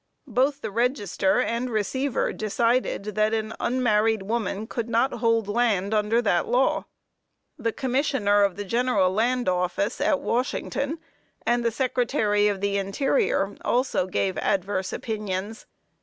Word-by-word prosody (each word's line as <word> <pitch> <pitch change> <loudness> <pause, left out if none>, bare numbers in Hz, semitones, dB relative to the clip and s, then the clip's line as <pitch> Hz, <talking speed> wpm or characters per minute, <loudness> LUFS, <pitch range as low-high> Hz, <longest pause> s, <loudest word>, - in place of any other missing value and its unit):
Both 270 +3 +1
the - - -4
Register 215 -3 +1
and 245 0 -1
Receiver 245 +5 -1
decided 230 +2 0
that 215 +1 +2
an 220 0 -3
unmarried 225 -4 +1
woman 215 -1 -2
could 235 +1 -4
not 235 +4 +2
hold 230 -3 +1
land 210 -3 +1
under 215 +3 +2
that 175 -5 +1
law. 250 +3 +2 0.7
The 230 - 0
Commissioner 255 -5 +1
of 200 -3 +2
the 205 - -5
General 230 -4 +2
Land 245 +4 +1
Office, 180 +2 0
at 285 - +2
Washington, 265 +5 -2 0.5
and 240 0 +2
the 235 - +2
Secretary 230 -4 +1
of 200 -2 -1
the 200 0 0
Interior, 200 - 0
also 245 -7 +1
gave 185 0 -1
adverse 190 0 -1
opinions. 210 -1 -4
220 Hz, 135 wpm, -25 LUFS, 200-245 Hz, 0.7 s, that